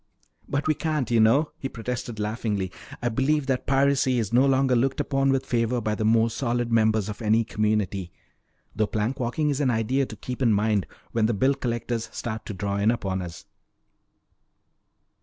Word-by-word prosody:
"But 140 +1 -1
we 155 - +4
can't, 150 -6 -2
you 115 - +4
know," 130 +8 +4
he 135 - -4
protested 120 -2 -5
laughingly. 105 -3 -2 0.3
"I 120 - +2
believe 135 +5 +1
that 130 -2 -1
piracy 135 -1 +3
is 115 -2 -2
no 130 +3 +5
longer 135 -1 +3
looked 135 +5 +1
upon 135 -1 +1
with 135 -1 0
favor 120 0 0
by 110 -1 -1
the 110 - -2
more 115 +1 +3
solid 120 -1 -1
members 110 -2 +3
of 105 +2 -6
any 110 +1 +3
community. 105 -4 -1 0.6
Though 110 0 +1
plank 115 +5 -2
walking 145 +5 0
is 140 +1 -1
an 135 - +2
idea 125 +4 +1
to 110 - -8
keep 125 +5 -6
in 115 -4 +4
mind 105 -2 +1 0.2
when 110 -2 +2
the 115 - 0
bill 130 +7 +3
collectors 120 -3 -3
start 110 -2 -5
to - - -4
draw 100 +1 -2
in 100 +2 +2
upon 95 -5 -1
us." 85 -2 -8
115 Hz, 185 wpm, -25 LUFS, 110-135 Hz, 0.6 s, no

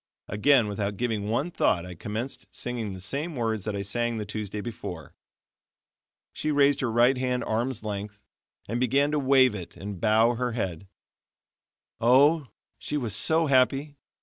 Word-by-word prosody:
Again, 120 +3 +3
without 100 -1 -3
giving 110 -4 -2
one 135 +10 -1
thought, 90 - +1
I 90 - -8
commenced 110 +9 -5
singing 120 -4 -4
the 95 - -8
same 140 - -3
words 110 -4 -2
that 105 -2 -2
I 100 - -3
sang 120 +3 -1
the 105 - -4
Tuesday 105 0 -5
before. 95 -8 -7 1.2
She 155 - -3
raised 145 -1 +3
her 125 -4 0
right 120 +3 +4
hand 125 -1 -1
arm's 115 +1 -2
length, 105 -1 -5 0.5
and 115 +3 -2
began 135 +4 +2
to 150 - +1
wave 130 -2 +4
it 95 -5 -8
and 100 -2 -7
bow 110 +2 +4
her 125 0 -2
head. 95 -5 -4 1.1
Oh! 140 +6 +4 0.3
she 150 - -3
was 115 -7 -1
so 160 +7 +4
happy. 140 +1 +2
120 Hz, 160 wpm, -26 LUFS, 105-135 Hz, 1.2 s, right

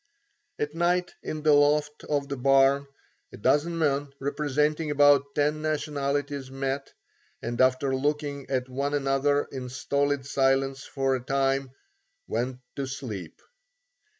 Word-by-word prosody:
At 150 0 -2
night 175 +2 +1
in 155 -1 -5
the 155 -1 +5
loft 150 +1 +2
of 145 -2 -1
the 140 - -3
barn, 135 +1 +4 0.4
a - - -10
dozen 155 +10 +2
men, 145 -3 0
representing 150 +2 0
about 145 -1 +4
ten 150 +1 +1
nationalities 145 -3 -2
met, 135 +1 -3 0.5
and 120 +1 -1
after 130 +1 +3
looking 145 0 -2
at 130 -1 -1
one 140 +3 -2
another 140 +1 +2
in 130 -2 -5
stolid 140 +1 -1
silence 135 0 +1
for 135 -1 0
a 130 - -3
time, 135 0 0 0.6
went 125 +1 -3 0.2
to 140 -1 -2
sleep. 120 - -6
140 Hz, 130 wpm, -27 LUFS, 135-145 Hz, 0.6 s, the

